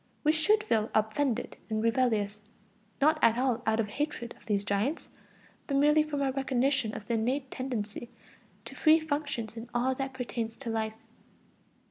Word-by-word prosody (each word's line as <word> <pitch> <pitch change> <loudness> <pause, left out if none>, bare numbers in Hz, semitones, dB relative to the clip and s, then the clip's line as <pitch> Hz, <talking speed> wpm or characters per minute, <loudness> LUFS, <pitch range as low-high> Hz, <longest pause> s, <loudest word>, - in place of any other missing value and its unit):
We 305 - +5
should 420 +8 +3
feel 220 - +1
offended 225 +3 0
and 220 0 -1
rebellious, 225 -4 +1 0.6
not 310 +2 +4
at 230 0 +5
all 250 -2 +1
out 220 0 +2
of 220 - +1
hatred 240 0 -3
of - - -23
these 205 -2 +1
giants, 205 +9 -1 0.6
but 275 - +1
merely 300 +2 +5
from 295 -2 -1
our 270 - +1
recognition 265 -3 0
of 210 - -7
the 235 - -2
innate 255 +4 0
tendency 235 -3 -4 0.6
to - - -8
free 315 0 +5
functions 285 -8 -3
in 230 +1 -8
all 255 +2 +2
that 270 0 -4
pertains 235 -3 -3
to 245 -4 -5
life. 220 -1 -2
245 Hz, 165 wpm, -30 LUFS, 220-280 Hz, 0.6 s, We